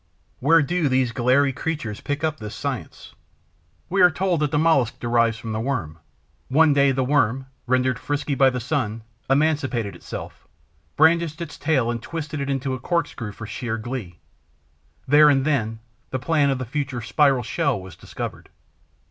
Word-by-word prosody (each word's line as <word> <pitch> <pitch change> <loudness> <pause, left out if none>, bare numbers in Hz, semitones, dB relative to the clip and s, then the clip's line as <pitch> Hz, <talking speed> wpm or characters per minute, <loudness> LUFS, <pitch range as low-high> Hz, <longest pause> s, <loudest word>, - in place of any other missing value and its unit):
Where 160 +4 +5
do 165 0 0
these 130 -2 +2
glairy 130 +3 +2
creatures 130 -8 -4
pick 145 +1 -3
up 155 -2 -1
this 105 -1 -7
science? - - -5 0.7
We 195 +1 +1
are 180 - +8
told 175 0 0
that 150 -1 +1
the 150 - 0
Mollusc 150 -7 +2
derives 115 -1 +2
from 115 0 -6
the 110 - -2
Worm. 110 - -3 0.5
One 150 +3 +4
day, 140 -1 +4
the 130 0 0
Worm, 130 -2 +1 0.2
rendered 130 -1 +1
frisky 145 0 -2
by 135 0 +5
the 125 -1 -3
sun, 120 -4 -2 0.3
emancipated 135 -7 +1
itself, - - -9 0.5
brandished 160 0 +3
its 170 -3 -6
tail 135 -6 +1
and 115 -1 -4
twisted 155 0 -5
it 140 - -3
into 135 -1 -1
a 130 - -4
corkscrew 145 - -2
for 115 - -8
sheer 115 +1 -4
glee. 110 -7 -6 0.9
There 150 +2 +7
and 135 -2 +3
then 115 -7 0 0.3
the 130 - -2
plan 145 +1 +2
of 135 - +1
the 130 - -4
future 135 -1 -3
spiral 135 +2 +3
shell 140 - 0
was 95 -3 -11
discovered. - - -7
135 Hz, 170 wpm, -23 LUFS, 120-150 Hz, 0.9 s, are